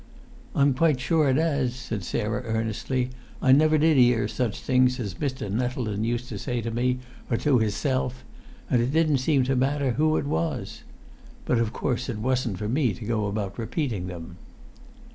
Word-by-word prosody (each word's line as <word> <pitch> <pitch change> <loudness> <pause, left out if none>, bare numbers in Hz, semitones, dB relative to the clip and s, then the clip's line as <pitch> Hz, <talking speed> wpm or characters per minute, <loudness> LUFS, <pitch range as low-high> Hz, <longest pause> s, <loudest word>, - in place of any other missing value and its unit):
"I'm 140 -1 +4
quite 150 0 +2
sure 155 +2 +2
it 130 - +3
'as," 140 -6 +1
said 110 -5 -5
Sarah, 105 +5 -2
earnestly. 115 +3 -2 0.3
"I 130 - +3
never 155 +3 +5
did 155 -2 +4
'ear 120 -4 +4
such 115 -1 -2
things 125 0 +2
as 100 -6 -3
Mr. 130 +1 -3
Nettleton 115 -2 -1
used 120 +1 -1
to 105 - -5
say 125 +2 -2
to 115 +1 -3
me, 125 +2 +1 0.3
or 115 - +1
to 130 0 +3
hisself, 125 +3 -1 0.5
it 120 +1 +2
didn't 155 -3 +3
seem 135 0 +2
to 135 +1 0
matter 135 +1 +1
who 155 +5 +2
it - - -1
was. 85 - -2 0.6
But 120 - +2
of 115 -2 0
course 125 0 -2
it 115 - -3
wasn't 125 -3 -1
for 105 - -3
me 125 -1 +1
to 115 - -8
go 110 -2 0
about 100 -1 -3
repeating 115 - -2
them." 85 -1 -8
125 Hz, 180 wpm, -26 LUFS, 110-135 Hz, 0.6 s, never